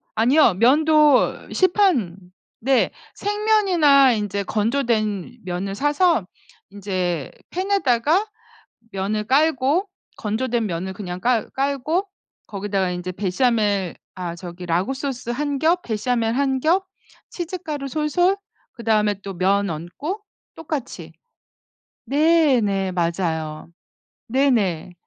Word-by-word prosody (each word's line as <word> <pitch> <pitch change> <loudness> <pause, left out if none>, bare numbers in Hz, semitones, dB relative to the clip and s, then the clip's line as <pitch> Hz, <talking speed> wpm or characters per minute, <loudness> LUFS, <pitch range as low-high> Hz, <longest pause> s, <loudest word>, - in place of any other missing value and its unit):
아니요. 235 +1 +4
면도 295 - +4
시판 350 - +2 0.4
네. 265 +2 +2 0.3
생면이나 385 - +4
인제 205 -2 -2
건조된 220 -1 -1
면을 185 +2 -4
사서 290 - +2 0.4
인제 185 -6 -3 0.2
팬에다가 360 - +1 0.7
면을 200 +2 -2
깔고 290 - +2 0.3
건조된 225 +1 -1
면을 185 +1 -4
그냥 180 -2 -6
깔 240 +1 +1
깔고 280 +7 -1 0.4
거기다가 195 -2 -2
인제 180 +1 -4
베샤멜 205 -2 0 0.2
아 175 -2 -5
저기 175 0 -9
라구 180 +10 0
소스 265 -3 -5
1 285 +3 -2
겹, 335 +4 +2
베샤멜 230 0 -1
1 265 +2 0
겹, 345 +7 +2 0.5
치즈 355 +1 -4
가루 290 -3 -4
솔솔, 320 +7 +1 0.4
그다음에 215 -3 +1
또 195 -1 -6
면 195 +2 +1
얹고 180 - -5 0.3
똑같이. 305 -5 -6 1.0
네. 305 -2 +4
네. 195 -3 0
맞아요. 165 -3 -2 0.6
네네. 225 - +1
235 Hz, 205 characters per minute, -22 LUFS, 195-295 Hz, 1.0 s, 아니요